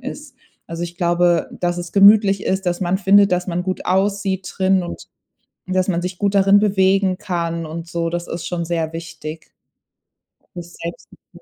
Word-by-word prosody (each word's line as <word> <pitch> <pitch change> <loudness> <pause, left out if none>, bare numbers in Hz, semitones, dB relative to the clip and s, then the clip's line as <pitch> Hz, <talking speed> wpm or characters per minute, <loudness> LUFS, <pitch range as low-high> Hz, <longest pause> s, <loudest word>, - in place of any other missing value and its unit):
ist. 270 +1 -9 0.3
Also, 165 +1 -5
ich 175 0 -9
glaube, 175 -1 +2
dass 175 -1 -1
es 175 -1 -6
gemütlich 200 0 +5
ist, 190 0 -1
dass 175 -1 -1
man 185 +1 0
findet, 200 0 +4
dass 180 0 0
man 180 0 -1
gut 185 0 -3
aussieht 190 -1 0
drin 190 0 +3
und 175 - -8 0.6
dass 185 0 0
man 175 -2 0
sich 180 +1 -5
gut 200 +1 0
darin 195 +1 +5
bewegen 195 -2 +2
kann 170 -2 -3
und 165 +2 -7
so, 170 0 -2
das 175 0 -4
ist 170 - -5
schon 170 -2 -3
sehr 165 -2 -2
wichtig 165 -1 -8 1.0
für's 175 0 -9
Selbstvertrauen. 170 +1 -9
180 Hz, 175 wpm, -20 LUFS, 170-195 Hz, 1.0 s, gemütlich